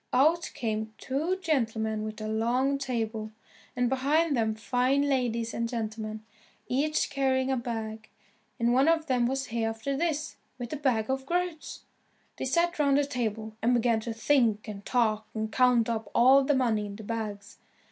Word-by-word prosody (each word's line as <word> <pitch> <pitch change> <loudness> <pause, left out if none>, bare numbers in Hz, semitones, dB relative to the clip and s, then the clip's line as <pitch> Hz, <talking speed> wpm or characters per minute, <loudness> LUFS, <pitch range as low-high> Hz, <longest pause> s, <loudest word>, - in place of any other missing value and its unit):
Out 315 +7 +3
came 220 -1 -3
two 315 +8 -1
gentlemen 225 - 0
with 215 0 -5
a 215 - -3
long 245 +6 +1
table, 225 -5 -3 0.5
and 245 0 +1
behind 285 +5 +2
them 220 -2 +1
fine 250 +5 +1
ladies 240 -5 0
and 230 0 -2
gentlemen, 220 -2 -4 0.4
each 295 +5 0
carrying 265 -1 +1
a - - +2
bag, 225 -3 -5 0.5
and 235 +1 +2
one 265 +4 +4
of 325 -1 +3
them 250 -5 +2
was 270 +1 -2
Hereafterthis 275 +8 -2 0.2
with 245 -2 -6
the - - -2
bag 245 -6 +1
of 265 0 -3
groats. 350 -1 -3 0.5
They - - -3
sat 340 +5 +1
round 280 -2 +4
the 290 - +2
table, 220 -5 -3
and 245 +2 +3
began 235 -1 +2
to 225 +1 -4
drink 225 -3 +2
and 205 -1 -7
talk 220 -3 +1
and 220 0 -2
count 250 -2 +4
up 220 -3 -3
all 265 +3 +6
the 285 +1 +2
money 225 -5 +1
in 200 - -8
the 220 - -9
bags. 205 -2 -5
240 Hz, 165 wpm, -28 LUFS, 220-275 Hz, 0.5 s, all